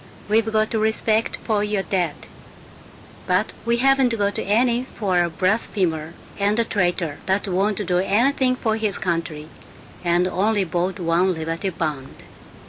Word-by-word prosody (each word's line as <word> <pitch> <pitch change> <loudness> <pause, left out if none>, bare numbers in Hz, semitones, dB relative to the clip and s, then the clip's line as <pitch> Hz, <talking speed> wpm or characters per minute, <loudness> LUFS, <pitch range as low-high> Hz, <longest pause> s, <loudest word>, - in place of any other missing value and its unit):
We've 220 +1 +2
got 215 0 +1
respect 220 0 +1
for 210 -2 0
your 210 -2 -1
dead, 175 -7 -1 1.1
but - - +1 0.2
we 235 0 +3
haven't 265 -2 +3
got 205 -1 0
any 240 +4 +1
for 185 -5 +1
a 170 - -1
blasphemer 180 -4 -1 0.2
and 205 +2 +1
a 235 - +3
traitor 175 -7 -1
that 195 +2 +1
won't 200 +2 0
do 180 0 +1
anything 255 +7 +2
for 220 -3 -1
his 215 -2 -1
country 165 -3 -3 0.6
and 175 +1 +2
only 205 +2 +1
bought 180 +2 -2
one 175 +2 +1
Liberty 165 +4 -3
Bond." 150 -6 -5
195 Hz, 140 wpm, -22 LUFS, 175-220 Hz, 1.1 s, we